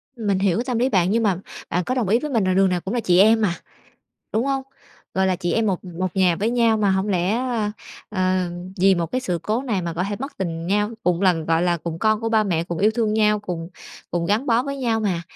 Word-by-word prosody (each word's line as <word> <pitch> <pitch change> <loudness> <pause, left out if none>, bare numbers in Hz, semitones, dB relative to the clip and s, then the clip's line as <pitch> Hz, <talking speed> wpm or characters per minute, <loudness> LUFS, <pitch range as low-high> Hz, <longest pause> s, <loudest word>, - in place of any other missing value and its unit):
Mình 205 -5 0
hiểu 195 -1 +2
cái 235 - 0
tâm 250 -3 -1
lý 255 +2 +2
bạn 185 -4 +2
nhưng 230 +1 +2
mà 190 -4 +1 0.3
bạn 180 +1 0
có 255 - -2
đồng 240 -6 0
ý 230 - +4
với 300 +2 -5
mình 225 -5 +2
là 185 0 +1
đường 195 0 +4
nào 180 -1 -1
cũng 190 - -4
là 245 - +1
chị 180 -4 +3
em 220 +3 +5
mà, 185 -5 +1 0.8
đúng 225 +3 +1
hông? 270 -1 0 0.5
Gọi 190 0 +2
là, 185 -1 +1
chị 175 - -2
em 225 -1 +1
một 190 -2 -1
một 180 +1 -4
nhà 180 -3 +3
với 215 +3 0
nhau 230 -2 +3
mà 205 -2 +2
hổng 190 +2 0
lẽ, 185 +2 +1
ơ, 235 -5 -1 0.4
ờ, 185 -2 0 0.3
vì 195 +1 +5
một 170 -2 -1
cái 255 +9 -2
sự 180 -9 -2
cố 225 +5 -1
này 215 -8 -1
mà 170 -1 -3
có 170 +2 -2
thể 205 - -3
mất 275 +3 -5
tình 165 -3 -3
nhau. 210 +3 +1
Cùng 180 0 +1
lần, 175 -4 +2
gọi 165 +1 +2
là, 175 -1 +2
cùng 165 0 -6
con 215 +1 +2
của 225 - -1
ba 220 -1 +3
mẹ, 170 -4 0
cùng 170 -1 -5
yêu 210 +2 +4
thương 220 -2 +1
nhau, 210 -1 +3
cùng 175 -5 -5 0.4
cùng 170 -1 -1
gắn 215 +8 +1
bó 235 0 +3
với 280 0 -4
nhau 235 -4 0
mà, 185 -5 -1
200 Hz, 275 wpm, -22 LUFS, 180-225 Hz, 0.8 s, em